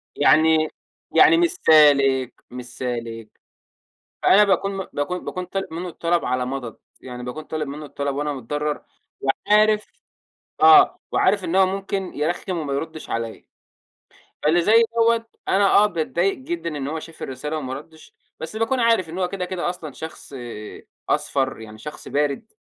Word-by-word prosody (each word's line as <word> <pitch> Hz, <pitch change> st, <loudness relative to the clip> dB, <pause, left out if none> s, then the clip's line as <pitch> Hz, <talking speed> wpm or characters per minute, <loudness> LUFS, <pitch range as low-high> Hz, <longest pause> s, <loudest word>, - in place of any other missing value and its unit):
يعني 155 Hz, 0 st, +4 dB, 0.4 s
يعني 365 Hz, -3 st, +6 dB
مش 345 Hz, 0 st, +4 dB
سالك، 140 Hz, -, +4 dB, 0.2 s
مش 125 Hz, 0 st, -7 dB
سالك. 115 Hz, -3 st, -5 dB, 0.9 s
فأنا 210 Hz, +2 st, +6 dB
باكون 195 Hz, 0 st, +1 dB
م 190 Hz, -, -4 dB
باكون 180 Hz, +5 st, -3 dB
باكون 185 Hz, -, -4 dB
طالب 195 Hz, +2 st, -4 dB
منّه 175 Hz, +2 st, -4 dB
الطلب 170 Hz, +1 st, -1 dB
على 125 Hz, 0 st, -1 dB
مَضَض. 130 Hz, -4 st, -5 dB, 0.2 s
يعني 125 Hz, -1 st, -8 dB
باكون 150 Hz, +5 st, -6 dB
طالب 155 Hz, -1 st, -4 dB
منّه 150 Hz, +2 st, -7 dB
الطلب 140 Hz, -1 st, -3 dB
وأنا 150 Hz, 0 st, -1 dB
متضرّر 145 Hz, +3 st, -3 dB, 0.4 s
وعارف 210 Hz, +8 st, +3 dB, 0.8 s
آه. 390 Hz, -1 st, +7 dB
وعارف 195 Hz, 0 st, +2 dB
إن 175 Hz, +3 st, -1 dB
هو 190 Hz, -1 st, +6 dB
ممكن 195 Hz, 0 st, -3 dB
يرخِّم 175 Hz, +4 st, -2 dB
وما 145 Hz, -3 st, -3 dB
يرُدِّش 155 Hz, +3 st, -5 dB
عليّا. 115 Hz, -1 st, -4 dB, 1.0 s
فاللي 165 Hz, +3 st, +3 dB
زي 225 Hz, +5 st, +5 dB
دوّة 230 Hz, 0 st, +3 dB, 0.2 s
أنا 200 Hz, +1 st, +3 dB
آه، 210 Hz, -, +6 dB
باتضايق 175 Hz, 0 st, 0 dB
جدًا 260 Hz, -, -4 dB
إن 140 Hz, -1 st, -3 dB
هو 160 Hz, -, -3 dB
شاف 165 Hz, 0 st, -12 dB
الرسالة 150 Hz, +4 st, -4 dB
وما 130 Hz, -3 st, -4 dB
رَدِّش، 155 Hz, +3 st, -12 dB, 0.3 s
بس 160 Hz, +7 st, -6 dB
باكون 225 Hz, +4 st, 0 dB
عارف 230 Hz, -7 st, +3 dB
إن 170 Hz, +3 st, -6 dB
هو 180 Hz, -1 st, 0 dB
كده، 185 Hz, -1 st, -4 dB
كده 180 Hz, -1 st, -3 dB
أصلًا 160 Hz, -5 st, -7 dB
شخص 160 Hz, -2 st, -9 dB, 0.7 s
أصفر، 135 Hz, -4 st, 0 dB
يعني 110 Hz, -1 st, -11 dB
شخص 150 Hz, +6 st, -9 dB
بارِد، 145 Hz, -, -1 dB
160 Hz, 155 wpm, -22 LUFS, 140-195 Hz, 1.0 s, آه